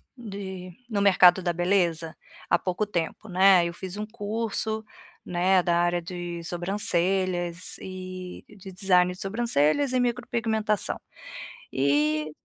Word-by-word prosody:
de 195 -5 -7 0.2
no 200 -1 0
mercado 185 -2 +6
da 175 -1 0
beleza 170 -2 0 0.3
há - - +4
pouco 190 +3 -1
tempo, 180 +2 -3
né. 185 -1 +5
Eu 170 - -3
fiz 190 +2 -7
um 210 - -3
curso, 220 0 -3 0.4
né, 180 +1 +2
da 170 - +2
área 175 0 +2
de 175 -1 -6
sobrancelhas 180 0 -1
e 185 -1 -8
de 195 -2 -12
design 180 -1 +3
de 180 - -10
sobrancelhas 230 - +1
e 255 - +1
micropigmentação, 230 -3 0 0.7
e 150 +3 +1
185 Hz, 125 wpm, -26 LUFS, 175-205 Hz, 0.7 s, mercado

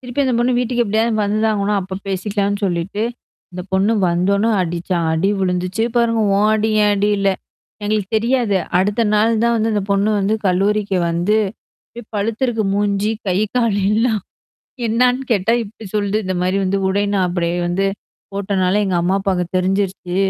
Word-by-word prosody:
திருப்பி 250 +2 -2
அந்த 255 -2 +1
பொண்ணு 240 +1 +2
வீட்டுக்கு 245 -1 0
எப்படியாவது 220 +2 +1
வந்துதா 215 +2 +1
ஆகணும் 200 0 0
அப்ப 190 0 -6
பேசிக்கலான்னு 200 +1 -1
சொல்லிட்டு. 180 +4 -2 0.5
அந்த 180 0 -5
பொண்ணு 195 +4 +2 0.2
வந்தோனே 200 +5 +1
அடிச்சா 175 +1 -2 0.2
அடி 160 +5 +1
விழுந்துச்சு 185 +3 -1
பாருங்க 230 -1 +2 0.2
ஓ 200 - +2
அடி 220 0 0
ஏன் 205 - +3
அடி 205 +1 +1
இல்ல. 200 0 +2 0.6
எங்களுக்கு 205 -2 -1
தெரியாது. 235 -2 +1 0.2
அடுத்த 205 +4 +1
நாள் 220 +1 +2
தான் 235 0 +3
வந்து 220 +1 0
அந்த 205 - 0
பொண்ணு 200 +2 +2
வந்து 200 +2 +1
கல்லூரிக்கு 200 +1 +1
வந்து 175 +6 +1 0.6
இப் 230 - -13
பழுத்தருக்கு 225 +2 -1
மூஞ்சி 205 +1 0 0.2
கை 185 0 +1 0.2
கால 230 -4 +2 0.2
எல்லாம். 220 -2 +1 0.7
என்னான்னு 250 +3 +2
கேட்டா 200 +1 +1
இப்படி 220 +1 -12
சொல்து 205 -1 0
இந்த 185 0 -2
மாரி 185 +2 +1
வந்து 195 +1 0
உடை 200 +2 +1
நான் 190 -2 +2
அப்படியே 175 -1 -1
வந்து 185 +3 0 0.5
போட்டனால 195 0 0
எங்க 185 -2 0
அம்மா 185 +3 +1
அப்பாங்க 190 -2 0
தெரிஞ்சிருச்சு. 185 -1 -1
200 Hz, 165 wpm, -19 LUFS, 190-220 Hz, 0.7 s, ஏன்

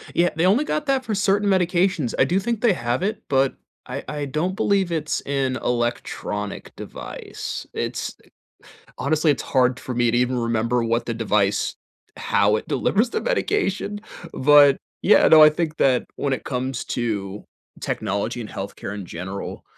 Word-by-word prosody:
Yeah, 175 +1 +4
they 160 +3 +1
only 210 +10 +4
got 300 -1 -2
that 270 -2 +1
for 225 - -3
certain 200 +1 +2
medications. 180 -6 +1
I - - +5
do 180 +3 +1
think 225 +2 -2
they 235 - +4
have 120 +1 -2
it, 215 +2 -2
but 135 -1 +2 0.3
I 130 +2 -5
I 150 -1 -3
don't 155 +7 -2
believe 200 -3 +1
it's 155 -2 -1
an 135 -2 -1
electronic 120 -4 -3
device. - - -7
It's - - -3
th - - -27 0.7
honestly, 155 +4 +2
it's 145 - 0
hard 125 -1 +3
for 125 - -6
me 120 0 +2
to 120 - +1
even 125 +1 +1
remember 115 +1 0
what 115 +1 0
the 115 - -1
device 105 -3 0 0.4
how 105 +1 +2
it - - -5
delivers 225 +4 +1
the - - -1
medication. 370 - -1 0.3
But, 145 0 +6 0.2
yeah, 210 - +6
no, 155 -1 +8
I 155 - +9
think 155 0 -2
that 130 -4 +2
when 140 - -1
it 130 - -2
comes 130 -1 -3
to 105 -4 -3 0.4
technology 110 +4 -2
and 110 - -6
health 100 0 -6
care 100 - -6
in 100 -2 -6
general, 95 +3 -6
135 Hz, 175 wpm, -23 LUFS, 120-185 Hz, 0.7 s, I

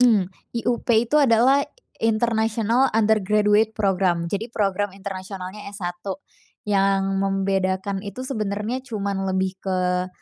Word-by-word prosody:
Mmm. 215 -7 +4 0.2
IUP 235 +1 -1
itu 240 +7 +3
adalah 260 +1 +5 0.4
International 225 +2 +2
Undergraduate 215 0 +3
Program. 190 -4 +1
Jadi 205 +3 -2
program 205 -3 -1
internasionalnya 195 0 -7
S1 175 -3 -5 0.6
yang 195 -1 +1
membedakan 195 0 0
itu 205 +5 -7
sebenernya 215 -1 -2
cuman 200 -6 -3
lebih 190 0 -1
ke 180 -1 0
200 Hz, 105 wpm, -23 LUFS, 190-225 Hz, 0.6 s, adalah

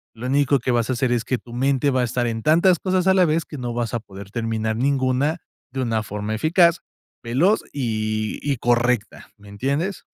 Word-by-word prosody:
Lo 115 +2 -7
único 140 +1 +3
que 125 +2 -1
vas 120 -1 +1
a - - +1
hacer 125 0 0
es 120 -2 +1
que 130 - -1
tu 120 - -14
mente 135 +2 +1
va 130 -1 +1
a - - +1
estar 120 +1 -1
en 115 -1 -2
tantas 170 - +4
cosas 185 -1 0
a 190 - +5
la 185 -1 +4
vez 160 0 0
que 150 - -9
no 120 -1 -3
vas 120 -2 -2
a 120 - 0
poder 100 -2 -12
terminar 110 -1 -2
ninguna, 135 +4 +1 0.3
de 135 +1 -3
una 115 -3 0
forma 105 +1 -4
eficaz, 170 - +3 0.4
veloz 145 - +2
y 110 -4 -2
y 145 -2 -1
correcta, 120 -1 0
¿me 100 0 -16
entiendes? 140 - -2
125 Hz, 210 wpm, -22 LUFS, 115-145 Hz, 0.4 s, a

